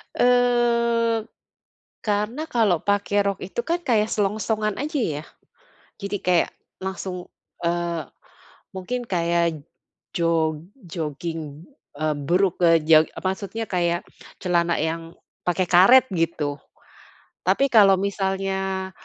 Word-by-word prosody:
Eee, 235 -2 +2 0.8
karena 210 +8 -1
kalau 220 - +1
pakai 205 0 +1
rok 200 -1 -1
itu 195 +6 -4
kan 340 +6 -1
kayak 225 -9 +1
selongsongan 215 +1 0
aja 300 -1 -2
ya. 155 -9 -2 0.8
Jadi 200 0 -3
kayak 180 -1 +3 0.3
langsung 190 -1 -5 0.3
eee, 170 -3 -2 0.6
mungkin 195 +7 -4
kayak 170 -4 0 0.5
jog 160 -2 +1 0.2
jogging, 160 -1 -5 0.3
eee, 155 -1 0
brukk 175 +6 0
eee, 165 -1 +6
jog 155 -1 +7 0.2
maksudnya 200 +4 -3
kayak 175 -2 -1 0.3
celana 170 -2 +1
yang 165 +1 -3 0.3
pakai 180 0 0
karet 220 +10 +7
gitu. 160 -4 -1 0.9
Tapi 275 - +3
kalau 200 -4 +7
misalnya, 190 -1 -2
190 Hz, 105 wpm, -23 LUFS, 170-215 Hz, 0.9 s, jog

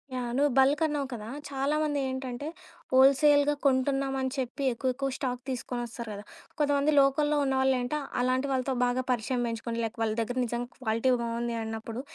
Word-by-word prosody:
Yeah! 245 -1 -3
నువ్వు 290 0 +3
బల్కన్నావు 290 +1 +2
కదా! 215 -2 -6 0.2
చాలామంది 290 +2 0
ఏంటంటే 260 +2 -4 0.5
హోల్‌సేల్‌గా 285 +2 +5
కొంటున్నాం 270 0 +2
అని 260 - -1
చెప్పి 260 +2 -3
ఎక్కువెక్కువ 260 +3 -1
స్టాక్ 250 -3 -3
తీసుకొనొస్తారు 240 -2 -4
గదా. 205 0 -8 0.4
కొంతమంది 285 0 +2
లోకల్‌‌లో 295 +2 +2
ఉన్నవాళ్ళేంటి 265 0 +1 0.2
అలాంటి 255 +2 +1
వాళ్ళతో 260 0 0
బాగా 245 +1 0
పరిచయం 245 +1 0
పెంచుకొని 230 0 -4
లైక్ 225 +1 -4
వాళ్ళ 220 -1 +1
దెగ్గర 245 +3 -2
నిజంగా 240 +1 -3
క్వాలిటీ 230 +1 +1
బావుంది 235 0 -2
అన్నప్పుడు, 225 +2 -5
260 Hz, 145 wpm, -28 LUFS, 240-280 Hz, 0.5 s, హోల్‌సేల్‌గా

